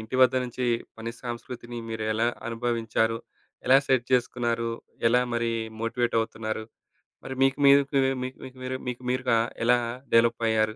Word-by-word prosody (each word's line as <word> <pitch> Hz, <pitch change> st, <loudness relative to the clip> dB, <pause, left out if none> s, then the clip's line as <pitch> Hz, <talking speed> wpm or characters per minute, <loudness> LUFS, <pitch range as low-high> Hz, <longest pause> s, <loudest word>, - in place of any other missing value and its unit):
ఇంటి 110 Hz, +4 st, -4 dB
వద్ద 130 Hz, 0 st, +6 dB
నుంచి 125 Hz, +1 st, -4 dB, 0.3 s
పని 115 Hz, +1 st, -4 dB
సంస్కృతిని 120 Hz, 0 st, -6 dB
మీరు 115 Hz, -1 st, -3 dB
ఎలా 115 Hz, +2 st, +1 dB, 0.2 s
అనుభవించారో. 115 Hz, -1 st, 0 dB, 0.5 s
ఎలా 130 Hz, +2 st, +7 dB
సెట్ 130 Hz, -3 st, +2 dB
చేసుకున్నారో, 120 Hz, -2 st, +1 dB, 0.4 s
ఎలా 120 Hz, +2 st, +5 dB
మరి 115 Hz, 0 st, 0 dB, 0.3 s
మోటివేటవుతున్నారు. 115 Hz, -2 st, -1 dB, 0.6 s
మరి 130 Hz, -, -5 dB
మీకు 135 Hz, 0 st, +3 dB
మీకు 140 Hz, 0 st, +7 dB, 0.4 s
మీకు 130 Hz, +1 st, -6 dB
మీక్ 130 Hz, 0 st, -10 dB
మీరు 130 Hz, 0 st, -3 dB
మీకు 125 Hz, 0 st, -4 dB
మీరుగా 125 Hz, -2 st, +2 dB, 0.3 s
ఎలా 125 Hz, +1 st, +5 dB, 0.4 s
డెవలపయ్యారు. 115 Hz, -2 st, +3 dB
120 Hz, 135 wpm, -27 LUFS, 115-125 Hz, 0.6 s, ఎలా